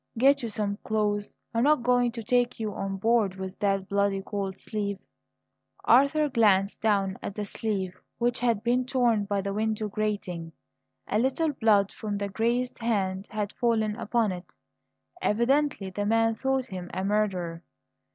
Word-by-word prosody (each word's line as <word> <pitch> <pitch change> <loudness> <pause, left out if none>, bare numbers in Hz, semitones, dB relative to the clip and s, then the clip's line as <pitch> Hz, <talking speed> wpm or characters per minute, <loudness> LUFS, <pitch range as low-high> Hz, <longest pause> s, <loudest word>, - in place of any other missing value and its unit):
"Get 275 +4 +5
you 235 - -3
some 205 -1 -2
clothes. 205 -1 -1 0.2
I'm 230 - +1
not 295 -3 +4
going 245 0 +3
to 230 -2 -5
take 245 +2 +1
you 215 -2 -2
on 195 0 -3
board 220 -2 +2
with 190 -1 -7
that 195 -2 0
bloody 200 -1 +1
coatsleeve." 200 +1 -3 0.9
Arthur 280 +5 +5
glanced 205 -7 +3
down 200 -3 +1
at 200 - -5
the 210 - -3
sleeve 195 -3 -3 0.2
which 240 0 0
had 235 -3 +1
been 245 +2 +2
torn 240 -5 +2
by 200 0 -1
the 195 0 -3
window 215 0 -1
grating. 190 -6 -3 0.5
A 210 - 0
little 270 +6 +1
blood 210 -5 +3
from 210 -2 -4
the 200 0 -3
grazed 235 +4 -1
hand 195 -4 -1
had 210 -1 -3
fallen 220 -3 +1
upon 230 -2 0
it. 180 -1 -6 0.8
Evidently 235 -2 +1
the 205 +2 -2
man 225 +1 +3
thought 265 +3 0
him 180 -6 -7
a 190 - -2
murderer. 190 -5 0
215 Hz, 160 wpm, -27 LUFS, 200-235 Hz, 0.9 s, Get